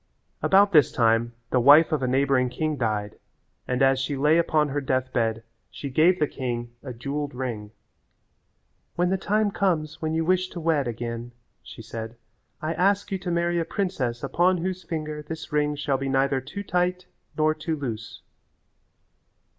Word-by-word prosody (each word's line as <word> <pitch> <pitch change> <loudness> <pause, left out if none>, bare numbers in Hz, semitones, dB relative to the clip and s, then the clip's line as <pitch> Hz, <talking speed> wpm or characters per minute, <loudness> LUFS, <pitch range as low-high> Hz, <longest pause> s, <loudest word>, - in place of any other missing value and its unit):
About 200 +1 +5
this 150 -7 +5
time 115 0 +2 0.2
the 130 - +3
wife 145 +6 +7
of 155 -3 0
a 130 - 0
neighbouring 130 -1 +2
king 155 +5 -2
died 110 -5 -2 0.5
and 125 +1 +1
as 135 0 +4
she 135 +1 -2
lay 150 +4 +4
upon 155 -3 +2
her 145 +1 -2
death 130 -1 -1
bed 115 -1 0 0.3
she 140 - -7
gave 165 +7 +4
the 150 - +2
king 120 -4 -4
a 130 - -7
jewelled 140 +3 -4
ring. 120 -5 -4 1.3
"When 175 +1 +1
the 190 - +2
time 210 +1 +1
comes 160 -6 -1
when 160 0 -1
you 160 0 0
wish 185 +1 +2
to 175 - -7
wed 155 -5 +1
again," 120 +1 -5 0.3
she 115 - -11
said, 115 0 -7 0.5
"I 155 +1 -1
ask 200 +4 +1
you 190 - -1
to 180 -1 -5
marry 170 0 +1
a - - +1
princess 135 -10 -2
upon 180 +1 +2
whose 185 +2 -3
finger 155 -3 -5
this 160 +2 -8
ring 150 0 +1
shall 140 -2 -1
be 135 0 -2
neither 135 0 +1
too 200 +10 -7
tight 180 0 0 0.3
nor 155 0 +3
too 155 +1 -3
loose." 120 -6 -6
150 Hz, 175 wpm, -25 LUFS, 125-170 Hz, 1.3 s, wife